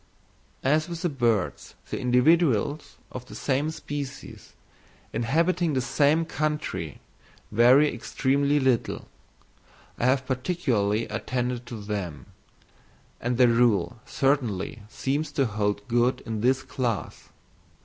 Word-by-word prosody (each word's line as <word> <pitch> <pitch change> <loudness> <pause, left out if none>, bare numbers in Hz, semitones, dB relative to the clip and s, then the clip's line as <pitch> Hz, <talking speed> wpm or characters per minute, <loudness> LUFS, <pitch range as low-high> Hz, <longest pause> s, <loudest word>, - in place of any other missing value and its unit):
As 155 +5 +2
with 165 -5 -3
birds 115 -6 0 0.2
the - - -2
individuals 145 - +2
of 125 0 -8
the - - -10
same 140 +3 0
species, 145 -3 -7 0.6
inhabiting 165 +8 +1
the 130 - +1
same 145 +6 +2
country, 150 - -3 0.5
vary 125 +7 +5
extremely 140 +4 +1
little, 130 -4 0 0.9
I - - +1
have 130 0 +2
particularly 125 - 0
attended 125 -1 -3
to 120 -3 -6
them; 100 -9 -5 0.9
and 120 0 -1
the 125 -1 +6
rule 115 -5 +2
certainly 125 -4 0
seems 145 +6 -2
to 140 - +2
hold 105 -2 -1
good 120 +2 +2
in 110 -2 -4
this 130 +2 +2
class. 125 -5 -3
130 Hz, 110 wpm, -26 LUFS, 115-145 Hz, 0.9 s, the